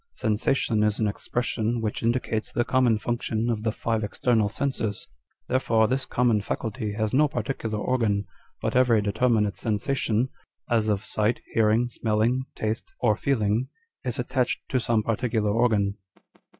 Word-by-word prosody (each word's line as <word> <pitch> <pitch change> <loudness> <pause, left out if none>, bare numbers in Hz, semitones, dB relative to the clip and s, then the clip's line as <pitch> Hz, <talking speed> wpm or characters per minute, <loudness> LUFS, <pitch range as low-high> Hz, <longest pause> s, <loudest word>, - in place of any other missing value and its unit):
Sensation 110 +1 +1
is 105 -1 +2
an 110 - +1
expression 115 +2 -1
which 110 -2 -2
indicates 115 -2 -1
the 120 - 0
common 125 -4 +3
function 115 0 -1
of 110 -2 -2
the 110 0 0
five 110 0 -1
external 110 0 +1
senses; 110 -4 -3 0.4
therefore 115 -4 +2
this 130 +2 -1
common 120 -4 +2
faculty 110 0 -3
has 110 0 -1
no 150 +3 +5
particular 115 -6 -3
organ, 105 -3 0 0.4
but - - -1
every 125 -3 +5
determinate 105 0 +1
sensation 115 +1 0 0.4
â€" - - +4
as 110 -1 +1
of 105 -1 0
sight, 110 +2 0
hearing, 115 +2 +3
smelling, 120 +2 0
taste, 110 - -3
or 105 - +3
feeling 115 -1 +1 0.4
â€" 125 - -2
is 120 - -3
attached 125 0 -1
to 130 - +1
some 115 -2 +1
particular 110 -1 0
organ." 105 -3 +2
115 Hz, 150 wpm, -26 LUFS, 105-125 Hz, 0.4 s, no